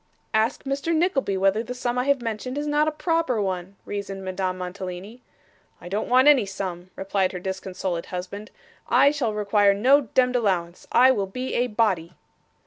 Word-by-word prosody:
'Ask 220 Hz, +4 st, +1 dB
Mr. 280 Hz, +4 st, -1 dB
Nickleby 285 Hz, -, +1 dB
whether 195 Hz, +3 st, +2 dB
the 250 Hz, +2 st, -6 dB
sum 245 Hz, 0 st, -1 dB
I 250 Hz, -, 0 dB
have 280 Hz, -3 st, +1 dB
mentioned 230 Hz, +4 st, -4 dB
is 295 Hz, -, -2 dB
not 295 Hz, +1 st, +2 dB
a -, -, +2 dB
proper 320 Hz, -6 st, 0 dB
one,' 190 Hz, -1 st, -3 dB
reasoned 195 Hz, -1 st, -5 dB
Madame 185 Hz, 0 st, -2 dB
Mantalini. 185 Hz, +5 st, -7 dB, 0.6 s
'I 175 Hz, -, -10 dB
don't 205 Hz, +3 st, -2 dB
want 255 Hz, +3 st, +5 dB
any 285 Hz, -6 st, +7 dB
sum,' 190 Hz, -2 st, -6 dB
replied 195 Hz, -1 st, -1 dB
her 180 Hz, -, -4 dB
disconsolate 185 Hz, -2 st, -4 dB
husband; 190 Hz, +3 st, -6 dB, 0.4 s
'I 265 Hz, +4 st, +5 dB
shall 250 Hz, -8 st, -2 dB
require 205 Hz, -1 st, +3 dB
no 260 Hz, +8 st, +5 dB
demd 250 Hz, -1 st, +3 dB
allowance. 185 Hz, -7 st, -1 dB
I 255 Hz, +2 st, +6 dB
will 200 Hz, -6 st, -1 dB
be 255 Hz, +7 st, -5 dB
a 245 Hz, -, +1 dB
body. 195 Hz, -7 st, 0 dB
210 Hz, 175 wpm, -24 LUFS, 190-255 Hz, 0.6 s, any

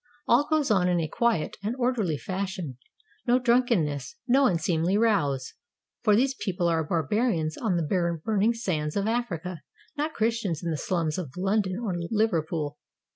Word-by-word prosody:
All 255 Hz, +5 st, +4 dB
goes 305 Hz, -6 st, +2 dB
on 180 Hz, -3 st, +3 dB
in 175 Hz, -1 st, +2 dB
a 160 Hz, -, -1 dB
quiet 230 Hz, -2 st, 0 dB
and 215 Hz, +4 st, -2 dB
orderly 240 Hz, -, 0 dB
fashion; 185 Hz, -7 st, -4 dB, 0.5 s
no 245 Hz, +1 st, +5 dB
drunken 245 Hz, -6 st, +3 dB
ness, 140 Hz, -4 st, -5 dB
no 265 Hz, +2 st, +5 dB
unseemly 170 Hz, +1 st, +1 dB
rows, 145 Hz, -, +1 dB, 0.5 s
for 210 Hz, -3 st, +4 dB
these 260 Hz, +4 st, +3 dB
people 180 Hz, -8 st, -1 dB
are 165 Hz, -1 st, +2 dB
barbarians 165 Hz, -, 0 dB
on 215 Hz, -6 st, -1 dB
the 170 Hz, +1 st, 0 dB
burning 220 Hz, +1 st, +2 dB
sands 155 Hz, -9 st, -2 dB
of 200 Hz, 0 st, 0 dB
Africa, 185 Hz, -8 st, -2 dB, 0.3 s
not 305 Hz, +1 st, -2 dB
Christians 215 Hz, -7 st, 0 dB
in 170 Hz, -, -1 dB
the -, -, 0 dB
slums 165 Hz, 0 st, -1 dB
of 150 Hz, -5 st, -7 dB
London 195 Hz, 0 st, 0 dB
or 225 Hz, -5 st, -2 dB, 0.2 s
Liverpool. 165 Hz, -8 st, 0 dB
190 Hz, 160 wpm, -27 LUFS, 160-230 Hz, 0.5 s, no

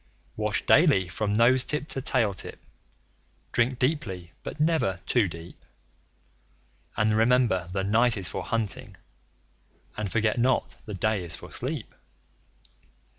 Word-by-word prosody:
Wash -, -, -1 dB
daily 95 Hz, -2 st, +5 dB
from 100 Hz, +5 st, -2 dB
nose 120 Hz, +4 st, +4 dB
tip 150 Hz, +3 st, -1 dB
to 135 Hz, -, -2 dB
tail 115 Hz, -6 st, +2 dB
tip; 90 Hz, -, -6 dB, 0.9 s
drink 120 Hz, +1 st, +1 dB
deeply, 105 Hz, -, -2 dB
but -, -, -7 dB
never 155 Hz, -, +1 dB
too 120 Hz, -6 st, +2 dB
deep; 85 Hz, 0 st, -11 dB, 1.3 s
And 110 Hz, 0 st, +2 dB
remember 110 Hz, -6 st, +2 dB
the 95 Hz, +1 st, -1 dB
night 115 Hz, +3 st, +3 dB
is 95 Hz, -3 st, 0 dB
for -, -, -4 dB
hunting, 115 Hz, -3 st, -3 dB, 1.0 s
and 105 Hz, -3 st, -4 dB
forget 115 Hz, 0 st, +1 dB
not 125 Hz, +2 st, +1 dB
the 105 Hz, -, -5 dB
day 105 Hz, 0 st, 0 dB
is 85 Hz, -1 st, 0 dB
for -, -, -12 dB
sleep. -, -, -4 dB
110 Hz, 130 wpm, -27 LUFS, 95-125 Hz, 1.3 s, daily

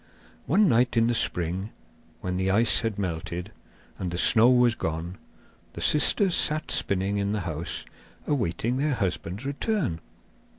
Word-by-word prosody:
One 200 Hz, +7 st, +4 dB
night 120 Hz, -3 st, +2 dB
in 115 Hz, -, +4 dB
the 120 Hz, -, +1 dB
spring, 90 Hz, -2 st, -1 dB, 0.5 s
when 90 Hz, 0 st, -3 dB
the 95 Hz, +1 st, 0 dB
ice 110 Hz, +4 st, +3 dB
had 115 Hz, -3 st, -3 dB
melted, 85 Hz, -2 st, -4 dB, 0.5 s
and 90 Hz, -, -3 dB
the 85 Hz, -, -4 dB
snow 110 Hz, +7 st, +5 dB
was 125 Hz, -2 st, +4 dB
gone, 85 Hz, -1 st, -5 dB, 0.5 s
the -, -, -8 dB
sisters 180 Hz, +5 st, +3 dB
sat 155 Hz, -1 st, +2 dB
spinning 100 Hz, +1 st, 0 dB
in 100 Hz, 0 st, -1 dB
the 105 Hz, -, -2 dB
house, 85 Hz, 0 st, -5 dB, 0.4 s
awaiting 120 Hz, -, -1 dB
their 145 Hz, 0 st, 0 dB
husbands' 95 Hz, +1 st, -3 dB
return. 140 Hz, -, -2 dB
105 Hz, 145 wpm, -26 LUFS, 90-125 Hz, 0.5 s, snow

